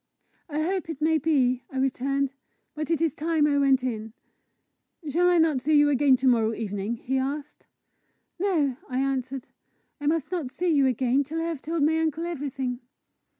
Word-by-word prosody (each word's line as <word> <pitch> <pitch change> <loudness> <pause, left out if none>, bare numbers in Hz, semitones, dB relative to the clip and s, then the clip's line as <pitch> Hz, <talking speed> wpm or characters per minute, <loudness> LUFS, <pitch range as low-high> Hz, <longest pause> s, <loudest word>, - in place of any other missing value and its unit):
"I 305 +1 -1
hope 365 0 -2
it 315 -4 -5
may 315 +1 +2
be!" 260 -5 +2
I 265 - -7
returned. 270 +1 0 0.2
" - - -48
But 305 0 -4
it 330 -1 +1
is 320 -5 +1
time 315 -1 +1
I 285 -1 +2
went 270 -2 +3
in." 220 -3 -4 0.9
"Shall 345 +5 +3
I 355 - +4
not 320 -5 +3
see 300 +3 +3
you 290 0 +5
again 275 -1 +4
to 260 +1 0
morrow 225 -3 +3
evening?" 205 0 -3
he 265 +3 -2
asked. 285 +3 -5 0.7
"No," 315 -10 +1
I 255 - -2
answered. 265 -1 -2 0.5
"I 290 - -3
must 320 0 0
not 335 -8 -2
see 355 +7 -2
you 280 -2 +4
again 255 +2 +2
till 310 +4 -4
I - - -1
have 330 -5 -4
told 320 0 -1
my 320 +2 +3
uncle 320 +1 -1
everything." 270 -6 -3
280 Hz, 190 wpm, -26 LUFS, 260-320 Hz, 0.9 s, you